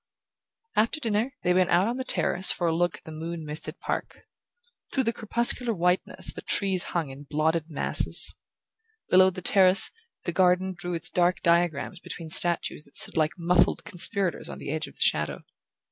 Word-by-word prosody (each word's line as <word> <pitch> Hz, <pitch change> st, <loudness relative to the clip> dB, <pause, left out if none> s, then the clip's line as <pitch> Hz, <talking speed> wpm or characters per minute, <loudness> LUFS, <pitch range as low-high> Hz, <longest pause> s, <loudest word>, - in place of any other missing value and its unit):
After 230 Hz, +8 st, +1 dB
dinner 230 Hz, +1 st, -2 dB
they 180 Hz, -, +2 dB
went 185 Hz, 0 st, +1 dB
out 180 Hz, +4 st, +2 dB
on 240 Hz, +2 st, -3 dB
the 260 Hz, -, -4 dB
terrace 190 Hz, -6 st, +1 dB
for 175 Hz, -, -3 dB
a 165 Hz, -1 st, 0 dB
look 175 Hz, 0 st, -1 dB
at -, -, -22 dB
the 160 Hz, -, -11 dB
moon 160 Hz, +1 st, -7 dB
misted 150 Hz, +1 st, -5 dB
park. -, -, -5 dB, 0.7 s
Through 265 Hz, -, 0 dB
the 230 Hz, -1 st, -1 dB
crepuscular 235 Hz, +1 st, +1 dB
whiteness 180 Hz, +1 st, 0 dB
the -, -, -9 dB
trees 190 Hz, -3 st, 0 dB, 0.2 s
hung 160 Hz, -5 st, -3 dB
in 140 Hz, +2 st, -13 dB
blotted 160 Hz, +2 st, -1 dB
masses. 150 Hz, -, +4 dB, 0.8 s
Below 185 Hz, +1 st, +6 dB
the 185 Hz, -1 st, -9 dB
terrace, 190 Hz, +1 st, +4 dB, 0.3 s
the -, -, -3 dB
garden 185 Hz, +1 st, +1 dB
drew 175 Hz, -1 st, -5 dB
its 165 Hz, -, -1 dB
dark 180 Hz, +1 st, 0 dB
diagrams 170 Hz, 0 st, 0 dB
between 165 Hz, -2 st, -9 dB
statues 170 Hz, -2 st, +4 dB
that 140 Hz, -, -20 dB
stood -, -, 0 dB
like 155 Hz, +1 st, -1 dB
muffled 175 Hz, +1 st, +1 dB
conspirators 185 Hz, +1 st, -1 dB
on -, -, -8 dB
the 140 Hz, -, -7 dB
edge 155 Hz, 0 st, -3 dB
of -, -, -16 dB
the -, -, -15 dB
shadow. 75 Hz, 0 st, 0 dB
175 Hz, 180 wpm, -25 LUFS, 165-190 Hz, 0.8 s, Below